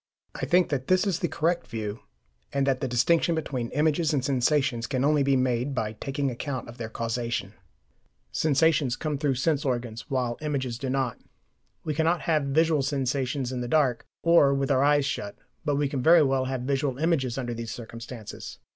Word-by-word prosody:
I -, -, -4 dB
think 180 Hz, 0 st, +4 dB
that 135 Hz, -4 st, -2 dB
this 185 Hz, +1 st, +3 dB
is 185 Hz, -4 st, 0 dB
the 175 Hz, -, 0 dB
correct 170 Hz, +2 st, 0 dB
view, 110 Hz, -1 st, -4 dB, 0.5 s
and 140 Hz, -1 st, +1 dB
that 135 Hz, -2 st, +1 dB
the 135 Hz, -, 0 dB
distinction 160 Hz, +8 st, +2 dB
between 130 Hz, -7 st, -3 dB
images 155 Hz, +1 st, +1 dB
and 130 Hz, -2 st, 0 dB
sensations 130 Hz, -2 st, +1 dB
can 130 Hz, +1 st, -1 dB
only 150 Hz, 0 st, +3 dB
be 135 Hz, 0 st, +3 dB
made 130 Hz, +1 st, 0 dB
by 110 Hz, -3 st, -1 dB
taking 135 Hz, +4 st, -2 dB
account 130 Hz, +1 st, -4 dB
of 120 Hz, 0 st, -11 dB
their 115 Hz, -1 st, -4 dB
causation. 115 Hz, -3 st, -3 dB, 0.8 s
Sensations 150 Hz, -3 st, +2 dB
come 150 Hz, 0 st, -3 dB
through 140 Hz, -3 st, +1 dB
sense 145 Hz, +3 st, +1 dB
organs, 120 Hz, -4 st, -3 dB
while 125 Hz, -3 st, -1 dB
images 130 Hz, -6 st, -2 dB
do 135 Hz, -, -3 dB
not. 130 Hz, -3 st, -1 dB, 0.6 s
We 155 Hz, -, -2 dB
cannot 160 Hz, +3 st, +1 dB
have 155 Hz, -3 st, +1 dB
visual 155 Hz, +2 st, +2 dB
sensations 135 Hz, -1 st, -1 dB
in 125 Hz, -1 st, -3 dB
the 120 Hz, -, -3 dB
dark, 130 Hz, -3 st, +2 dB, 0.2 s
or 165 Hz, -5 st, +5 dB
with 135 Hz, 0 st, 0 dB
our 135 Hz, 0 st, +3 dB
eyes 145 Hz, -1 st, +4 dB
shut, 100 Hz, -6 st, -3 dB, 0.3 s
but 145 Hz, -2 st, 0 dB
we 145 Hz, 0 st, +1 dB
can 135 Hz, -1 st, -3 dB
very 165 Hz, +4 st, +7 dB
well 135 Hz, -1 st, +1 dB
have 130 Hz, -1 st, -3 dB
visual 135 Hz, 0 st, -1 dB
images 140 Hz, -6 st, 0 dB
under 120 Hz, -2 st, -3 dB
these 115 Hz, -1 st, -5 dB
circumstances. 115 Hz, -1 st, -8 dB
135 Hz, 190 wpm, -27 LUFS, 125-150 Hz, 0.8 s, very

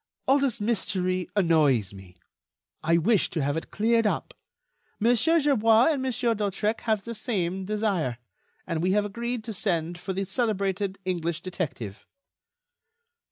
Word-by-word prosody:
All 275 Hz, +2 st, +5 dB
this 270 Hz, -4 st, 0 dB
mystery 185 Hz, -4 st, 0 dB
annoys 150 Hz, -, +3 dB
me. 95 Hz, -2 st, -13 dB, 0.6 s
I 165 Hz, +1 st, +3 dB
wish 195 Hz, +4 st, +2 dB
to 160 Hz, -4 st, -2 dB
have 145 Hz, +1 st, 0 dB
it 165 Hz, -, -4 dB
cleared 225 Hz, +1 st, +2 dB
up. -, -, -2 dB, 0.7 s
Monsieur 245 Hz, +9 st, +4 dB
Gerbois 235 Hz, -4 st, +4 dB
and 285 Hz, -4 st, -1 dB
Monsieur 250 Hz, -2 st, 0 dB
d'Hautrec 210 Hz, +1 st, -1 dB
have 215 Hz, -3 st, +1 dB
the 235 Hz, -, -5 dB
same 190 Hz, -5 st, -2 dB
desire, 200 Hz, -, -1 dB, 0.5 s
and 165 Hz, -3 st, -2 dB
we 185 Hz, +2 st, +2 dB
have 205 Hz, 0 st, +2 dB
agreed 235 Hz, +3 st, -3 dB
to 220 Hz, 0 st, -5 dB
send 175 Hz, -3 st, -2 dB
for 190 Hz, +2 st, -4 dB
the 195 Hz, +1 st, -2 dB
celebrated 200 Hz, -3 st, -1 dB
English 170 Hz, -3 st, -2 dB
detective." 135 Hz, -, -5 dB
195 Hz, 145 wpm, -26 LUFS, 170-225 Hz, 0.7 s, All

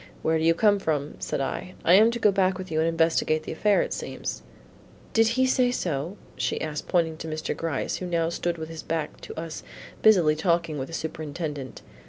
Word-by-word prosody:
"Where 160 Hz, 0 st, +2 dB
do -, -, -1 dB
you 165 Hz, 0 st, +4 dB
come 205 Hz, +1 st, +4 dB
from," 150 Hz, -5 st, -2 dB
said -, -, -2 dB
I, 180 Hz, +7 st, -4 dB
"I 170 Hz, -, +6 dB
am 215 Hz, +4 st, +7 dB
to 235 Hz, -, -2 dB
go 215 Hz, -3 st, +4 dB
back 190 Hz, -1 st, +2 dB
with 185 Hz, -2 st, -7 dB
you 155 Hz, -, +1 dB
and 160 Hz, +1 st, +3 dB
investigate 160 Hz, -1 st, +2 dB
the -, -, -6 dB
affair 205 Hz, +5 st, +3 dB
it -, -, -4 dB
seems." -, -, -5 dB, 0.7 s
"Did 225 Hz, 0 st, +5 dB
he 260 Hz, -, +4 dB
say 255 Hz, -1 st, +3 dB
so?" 170 Hz, -, -2 dB, 0.2 s
she -, -, -1 dB
asked, 150 Hz, -1 st, -4 dB
pointing 165 Hz, -3 st, +1 dB
to 160 Hz, -, -7 dB
Mr. 155 Hz, 0 st, -3 dB
Gryce 160 Hz, -5 st, -2 dB
who 180 Hz, -, -5 dB
now 165 Hz, -1 st, +1 dB
stood 170 Hz, 0 st, -2 dB
with 160 Hz, 0 st, -6 dB
his 165 Hz, -1 st, -7 dB
back 160 Hz, -2 st, -3 dB
to -, -, -7 dB
us 165 Hz, -1 st, -6 dB, 0.4 s
busily 175 Hz, -8 st, +5 dB
talking 170 Hz, -2 st, 0 dB
with 130 Hz, -, -3 dB
the 165 Hz, -, -11 dB
Superintendent. 150 Hz, -4 st, -5 dB
165 Hz, 215 wpm, -26 LUFS, 155-185 Hz, 0.7 s, am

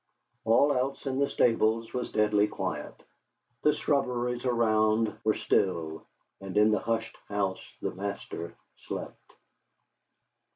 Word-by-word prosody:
All 140 Hz, +6 st, +5 dB
else 130 Hz, +3 st, -1 dB
in 135 Hz, -1 st, -1 dB
the 140 Hz, -, +2 dB
stables 115 Hz, -1 st, +2 dB
was 125 Hz, -1 st, -3 dB
deadly 105 Hz, -1 st, +3 dB
quiet; -, -, -5 dB, 0.6 s
the 150 Hz, -, +5 dB
shrubberies 125 Hz, -4 st, 0 dB
around 110 Hz, -2 st, +2 dB
were 110 Hz, -, +2 dB
still; 80 Hz, -4 st, 0 dB, 0.3 s
and 95 Hz, 0 st, -5 dB
in 105 Hz, +1 st, +6 dB
the 105 Hz, -, +2 dB
hushed 115 Hz, 0 st, -2 dB
house 100 Hz, -2 st, -1 dB, 0.2 s
the -, -, -1 dB
master 95 Hz, -3 st, -5 dB, 0.3 s
slept. -, -, -7 dB
110 Hz, 120 wpm, -29 LUFS, 105-125 Hz, 0.6 s, in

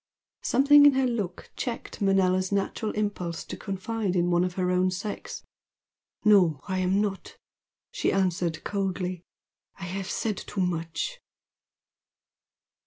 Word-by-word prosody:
Something 290 Hz, +3 st, +6 dB
in 285 Hz, -, +6 dB
her 265 Hz, 0 st, +2 dB
look 210 Hz, -8 st, -3 dB
checked 235 Hz, -2 st, -5 dB
Manella's 185 Hz, -1 st, +2 dB
natural 200 Hz, +2 st, -1 dB
impulse 200 Hz, -5 st, -2 dB
to -, -, -7 dB
confide 195 Hz, 0 st, -3 dB
in 175 Hz, 0 st, +2 dB
one 175 Hz, 0 st, +3 dB
of 180 Hz, -1 st, -2 dB
her 180 Hz, -1 st, 0 dB
own 180 Hz, 0 st, +3 dB
sex. 200 Hz, +3 st, -5 dB, 0.8 s
"No, 185 Hz, -9 st, +5 dB
I 190 Hz, -1 st, -1 dB
am 185 Hz, +2 st, +2 dB
not!" 200 Hz, -2 st, -4 dB, 0.5 s
she -, -, 0 dB
answered 175 Hz, -4 st, 0 dB
coldly 185 Hz, -3 st, -2 dB, 0.6 s
"I 190 Hz, -, -9 dB
have 190 Hz, +1 st, -4 dB
said 215 Hz, -2 st, -1 dB
too 205 Hz, -, -4 dB
much." 175 Hz, -, -2 dB
190 Hz, 130 wpm, -27 LUFS, 180-210 Hz, 0.8 s, Something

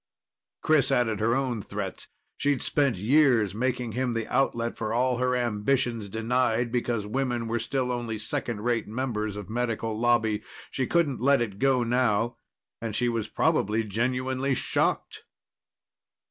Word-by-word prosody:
Chris 145 Hz, -3 st, +3 dB
added 115 Hz, -5 st, +1 dB
her 115 Hz, +2 st, +2 dB
own 130 Hz, -5 st, -1 dB
threats. 100 Hz, -1 st, -6 dB, 0.3 s
She'd 145 Hz, -2 st, 0 dB
spent 140 Hz, -7 st, +1 dB
years 120 Hz, -2 st, +3 dB
making 125 Hz, +1 st, -1 dB
him 125 Hz, +1 st, -1 dB
the 115 Hz, -1 st, -2 dB
outlet 120 Hz, -3 st, +1 dB
for 110 Hz, -1 st, -3 dB
all 125 Hz, 0 st, +2 dB
her 125 Hz, 0 st, +1 dB
ambitions, 120 Hz, -1 st, 0 dB
denied 115 Hz, +2 st, 0 dB
because 120 Hz, -3 st, -1 dB
women 120 Hz, 0 st, -1 dB
were 120 Hz, +1 st, -1 dB
still 125 Hz, +2 st, -1 dB
only 120 Hz, -2 st, -3 dB
second 105 Hz, 0 st, -3 dB
rate 120 Hz, 0 st, 0 dB
members 110 Hz, -3 st, -2 dB
of 105 Hz, -3 st, -7 dB
Medical 115 Hz, -1 st, -2 dB
Lobby. 110 Hz, -2 st, +2 dB, 0.3 s
She 130 Hz, -2 st, -1 dB
couldn't 155 Hz, -8 st, +1 dB
let 140 Hz, +2 st, +4 dB
it 105 Hz, -4 st, -3 dB
go 135 Hz, -2 st, +3 dB
now. 120 Hz, -1 st, +1 dB, 0.4 s
And 115 Hz, -2 st, -3 dB
she 120 Hz, +1 st, +1 dB
was 115 Hz, -2 st, -2 dB
probably 110 Hz, +3 st, +1 dB
genuinely 130 Hz, +5 st, -1 dB
shocked. -, -, -1 dB
120 Hz, 145 wpm, -27 LUFS, 110-130 Hz, 0.4 s, let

